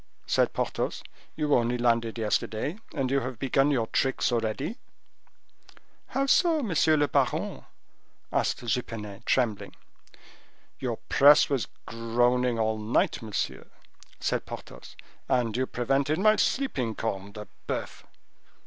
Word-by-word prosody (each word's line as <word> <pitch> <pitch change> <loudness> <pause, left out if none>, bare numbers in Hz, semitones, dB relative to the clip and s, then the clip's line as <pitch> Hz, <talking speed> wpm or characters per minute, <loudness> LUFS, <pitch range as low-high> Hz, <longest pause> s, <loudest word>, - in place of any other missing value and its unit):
said - - +2
Porthos. - - -2 0.3
"You 150 -1 0
only 120 0 +2
landed 115 -1 +1
yesterday 110 - -1 0.2
and 130 -1 -1
you 140 - +3
have 130 -1 -5
begun 135 +3 +2
your 125 -6 +1
tricks 130 +3 0
already." 120 - -2 1.3
"How 275 - 0
so, 320 +1 +3
monsieur 160 -6 +3
le 145 0 +3
baron?" - - 0 0.7
asked - - 0
Jupenet, 105 -3 -4
trembling. 115 -6 0 1.0
"Your - - -2
press 145 +1 +6
was 135 -4 0 0.2
groaning 120 +1 +1
all 110 -1 0
night, 110 +4 +1
monsieur," 110 -3 -3 0.5
said - - -1
Porthos, - - -10 0.3
"and 120 -4 +1
you 130 +1 0
prevented 135 +5 0
my 215 +3 +5
sleeping, 130 - 0
corne 100 -2 -4
de 105 0 -8 0.2
boeuf!" - - -4
125 Hz, 120 wpm, -27 LUFS, 115-140 Hz, 1.3 s, press